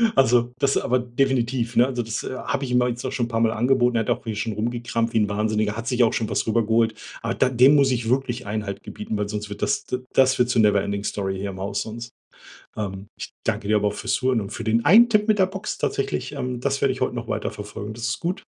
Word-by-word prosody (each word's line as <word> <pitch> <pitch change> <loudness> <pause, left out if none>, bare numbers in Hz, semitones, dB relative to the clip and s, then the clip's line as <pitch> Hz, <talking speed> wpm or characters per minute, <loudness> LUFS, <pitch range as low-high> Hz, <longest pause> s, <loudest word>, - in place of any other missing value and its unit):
also 125 -3 +3
das 140 -1 +2
aber 125 +1 +1
definitiv, 120 -1 0
ne, 120 - +6
also 125 -2 -2
das, 110 0 -4
äh, - - -5
habe 135 +1 -2
ich 125 - -5
ihm 125 0 +4
auch 125 - +2
jetzt 120 0 -4
auch - - -2
schon 120 - -1
'n - - -8
paar 115 -1 -1
Mal 115 -1 +3
angeboten, 120 +2 +2
er - - +2
hat 110 - -4
auch - - 0
hier 110 -2 -4
schon 110 +2 -2
rumgekramt, 115 +1 -2
wie - - +2
'n 105 -1 +1
Wahnsinniger, 105 0 0
hat 115 0 -5
sich 125 -1 +3
auch 115 - +2
schon 110 - -1
was - - 0
rübergeholt. 115 0 +2 0.3
Aber 115 0 -2
da 130 - +2
dem 130 +4 +6
muss 140 -2 +4
ich 115 -2 -1
wirklich 125 -1 -1
Einhalt 100 -1 -4
gebieten, 105 0 -5
weil 105 -1 -2
sonst 105 0 -4
wird 105 - -8
das, - - 0
d 125 - -3
das 130 0 +4
wird 125 0 +3
zur 115 - +3
Never 105 -2 +4
Ending 100 0 -3
Story 95 -2 -2
hier 100 +1 -3
im 95 - -9
Haus 100 +1 -2
sonst 115 +2 -8 0.7
ähm, 95 -2 -5
ich - - -6
danke 100 - -2
dir 110 - +4
aber 105 0 +2
auch - - -3
fürs - - -2
Zuhören 130 -3 +1
und 100 - -6
für - - -6
den 115 +1 +1
einen 225 +10 +7
Tipp 210 -1 +2
mit 215 -1 +3
der 190 - +5
Box 195 +2 -5
tatsächlich, 135 -1 -2
ähm, 125 -3 -4
das - - -1
werde - - +2
ich - - -7
heute - - 0
noch - - -5
weiter - - -2
verfolgen. 105 +1 -7
Das 115 0 -3
ist - - -2
gut. 175 +3 -3
115 Hz, 275 wpm, -23 LUFS, 105-125 Hz, 0.7 s, einen